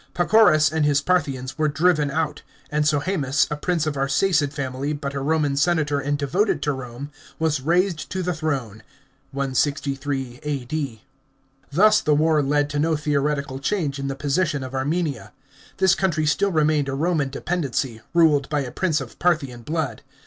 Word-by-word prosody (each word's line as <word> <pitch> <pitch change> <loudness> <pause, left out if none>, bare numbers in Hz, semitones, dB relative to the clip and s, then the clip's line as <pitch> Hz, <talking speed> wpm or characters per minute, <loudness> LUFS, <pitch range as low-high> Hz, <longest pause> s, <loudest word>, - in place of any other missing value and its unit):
Pacorus 175 -5 +5
and 160 -1 0
his 145 -1 +3
Parthians 140 -5 -1
were 155 - +3
driven 155 -1 +2
out, 155 +1 -2 0.3
and 150 0 +1
Sohsemus, 145 -2 +1
a - - 0
prince 165 +1 -1
of 155 - -1
Arsacid 145 +2 +1
family, 140 0 -3
but 140 -1 -4
a 140 - -3
Roman 145 -1 +1
senator 150 -1 +1
and 145 +1 -1
devoted 165 +3 0
to 145 - +1
Rome, 130 +2 -7 0.3
was 155 -4 0
raised 175 +3 0
to 185 0 -3
the 180 0 -1
throne 135 -9 -3 0.5
(163 135 -1 -2
A.D.). 140 -4 -4 0.7
Thus 210 +8 +5
the 150 - +2
war 155 0 +3
led 145 +1 +1
to 145 - -1
no 160 +1 +2
theoretical 145 -2 -1
change 145 -3 -1
in 140 - -3
the 135 - -3
position 145 0 0
of 130 0 -7
Armenia. 145 +2 -2 0.4
This 190 -1 +4
country 170 -6 0
still 150 +7 +1
remained 155 -3 +2
a 135 - -2
Roman 155 -2 0
dependency, 135 -6 -2
ruled 150 -5 +4
by 150 -2 0
a 130 -3 -5
prince 165 -5 0
of - - -10
Parthian 145 -9 0
blood. 150 -3 -3
150 Hz, 165 wpm, -23 LUFS, 140-160 Hz, 0.7 s, Pacorus